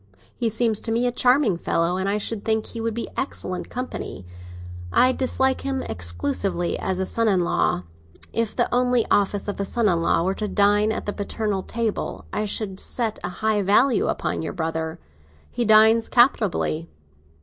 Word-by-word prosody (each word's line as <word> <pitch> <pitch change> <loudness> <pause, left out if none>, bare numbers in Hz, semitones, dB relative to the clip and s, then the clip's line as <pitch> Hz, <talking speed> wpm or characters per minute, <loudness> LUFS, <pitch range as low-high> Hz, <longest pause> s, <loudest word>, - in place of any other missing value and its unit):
He 235 -2 0
seems 220 -1 +1
to 225 - -5
me 235 +2 +1
a 245 - +2
charming 250 -5 +3
fellow, 170 +1 0
and 190 +1 -1
I 205 - +1
should 210 0 -4
think 220 -1 0
he 230 - -6
would 225 -1 -2
be 235 - -2
excellent 185 -8 -4
company. 250 - -6 0.7
I 255 - +5
dislike 265 0 +1
him, 270 -1 -2
exclusively, 140 - -2
as 190 -1 -2
a 190 - -1
son 230 +4 0
in 190 -4 +3
law. 90 - 0 0.5
If 230 -2 -1
the - - +2
only 250 -1 +2
office 205 0 +1
of 205 - -4
a - - 0
son 225 +3 0
in 170 -4 +2
law 165 - +2
were 190 +2 +1
to 210 +1 -3
dine 205 +1 +3
at - - -4
the 205 - -2
paternal 205 -1 -2
table, 230 +1 -3
I 215 - -1
should 200 -2 -3
set 230 -4 -1
a 175 - -2
high 210 +3 0
value 210 +5 +3
upon - - -2
your 160 - -4
brother. 160 -1 -3 0.5
He 240 - -1
dines 220 +1 +5
capitally. 210 - +2
210 Hz, 185 wpm, -23 LUFS, 190-230 Hz, 0.7 s, I